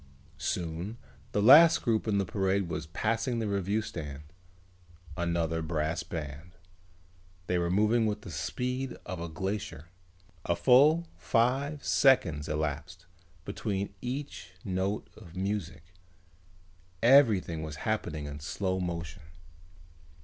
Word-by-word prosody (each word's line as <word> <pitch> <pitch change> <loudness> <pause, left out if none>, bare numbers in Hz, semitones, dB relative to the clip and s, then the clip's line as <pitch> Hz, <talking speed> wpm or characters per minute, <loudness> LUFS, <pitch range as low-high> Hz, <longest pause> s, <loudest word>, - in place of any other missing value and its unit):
Soon 85 +6 -3 0.3
the 105 - +1
last 155 +8 +8
group 115 -2 +1
in 105 -2 +2
the 100 - +1
parade 95 0 0
was 80 -1 -4
passing 115 - -1
the 115 -2 -1
reviewing 100 +2 0
stand. 75 -6 -7 0.9
Another 85 -1 -1
brass 80 +1 -1
band. 80 +2 -7 0.9
They 90 -1 0
were 85 0 0
moving 110 +4 +3
with 105 0 -2
the 95 - -8
speed 125 - -3
of 95 -4 -5
a 85 - -4
glacier. 85 -2 -4 0.5
A 85 - 0
full 140 - +5
five 135 +5 0
seconds 80 - +3
elapsed 75 +4 -3 0.4
between 100 -1 -3
each 125 -8 -5
note 95 +2 -1
of 90 -5 -14
music. 95 -3 -4 1.1
Everything 115 - +5
was 80 -1 -5
happening 85 -9 -2
in 75 0 -6
slow 95 +5 -2
motion. 85 -3 -4
95 Hz, 120 wpm, -29 LUFS, 80-110 Hz, 1.1 s, last